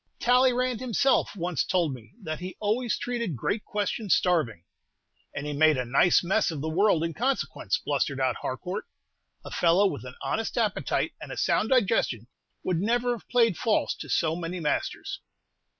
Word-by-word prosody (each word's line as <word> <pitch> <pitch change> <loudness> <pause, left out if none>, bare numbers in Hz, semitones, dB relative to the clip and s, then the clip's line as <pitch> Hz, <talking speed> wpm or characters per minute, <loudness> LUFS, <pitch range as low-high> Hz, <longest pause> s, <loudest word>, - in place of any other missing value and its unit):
"Talleyrand 250 -1 +3
himself 255 -1 +1
once 175 -2 -1
told 175 -6 +1
me 120 -4 -12
that 155 -3 -4
he 180 +1 -6
always 220 +3 0
treated 235 - -3
great 205 - -2
questions 205 0 0
starving." 155 - 0 0.7
"And 145 - -4
he 150 - -3
made 155 0 +4
a 125 - -1
nice 135 +10 +4
mess 195 +4 +2
of 160 -4 -4
the 155 +3 -3
world 180 -1 +3
in 165 0 -2
consequence," 260 - -1
blustered - - -1
out - - +1
Harcourt. - - -4 0.6
"A - - -8
fellow 175 +4 +3
with 150 -10 -1
an 125 0 -9
honest 225 +2 -2
appetite 215 -4 0
and - - -8
a - - -6
sound 215 - +1
digestion 200 - +2 0.4
would 180 -2 0
never 240 +4 +1
have 235 -3 -6
played 230 -6 +3
false 220 - +1
to - - -8
so 160 -1 +1
many 175 +1 -4
masters." 150 -3 -2
185 Hz, 170 wpm, -27 LUFS, 160-235 Hz, 0.7 s, made